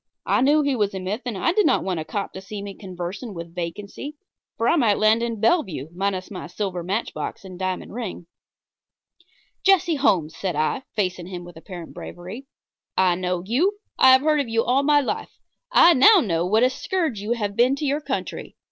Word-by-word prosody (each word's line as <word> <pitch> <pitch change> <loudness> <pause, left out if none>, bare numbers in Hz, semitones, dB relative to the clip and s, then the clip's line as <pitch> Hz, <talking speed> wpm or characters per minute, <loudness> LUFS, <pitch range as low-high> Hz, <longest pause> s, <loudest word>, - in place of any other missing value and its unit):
I - - +2
knew 295 +3 +4
he 280 -2 +1
was 205 -4 0
a - - -3
myth, 195 +6 -3
and 225 -5 -3
I 330 - +2
did 420 +1 +3
not - - +2
want 185 -3 -2
a - - -3
cop 200 +5 -4
to 190 - -7
see 200 +1 -7
me 200 -1 -6
conversing 190 +3 -7
with 170 0 -8
vacancy, 200 - -6 0.4
for 230 - +1
I - - +4
might 230 -10 +3
land 215 +2 +4
in 230 -2 -2
Bellevue 195 - +1
minus 190 +1 -2
my 185 - -6
silver 190 -4 -3
matchbox 195 +2 -4
and 185 -1 -10
diamond 185 0 -3
ring. 220 -7 -5 1.4
"Jesse 360 -4 +4
Holmes," 170 - +2
said 185 -1 -3
I, 155 - 0
facing 180 -4 -1
him 180 -2 -7
with 175 0 -12
apparent 170 0 -9
bravery, 190 +10 -9 0.5
"I 185 -1 +4
know 180 0 -2
you. 335 - +1 0.2
I 260 - +8
have 260 - +6
heard 305 0 +2
of 275 -5 -1
you 230 0 +2
all 255 +3 +2
my 290 0 +4
life. 270 - -4 0.3
I 350 -8 +7
know 375 +9 +7
now 175 - 0
what 215 +5 +3
a 255 - +4
scourge 320 - -2
you 210 +4 -1
have 205 -4 -3
been 250 +4 +4
to 295 - -4
your 285 +2 0
country. - - -4
205 Hz, 205 wpm, -23 LUFS, 185-265 Hz, 1.4 s, I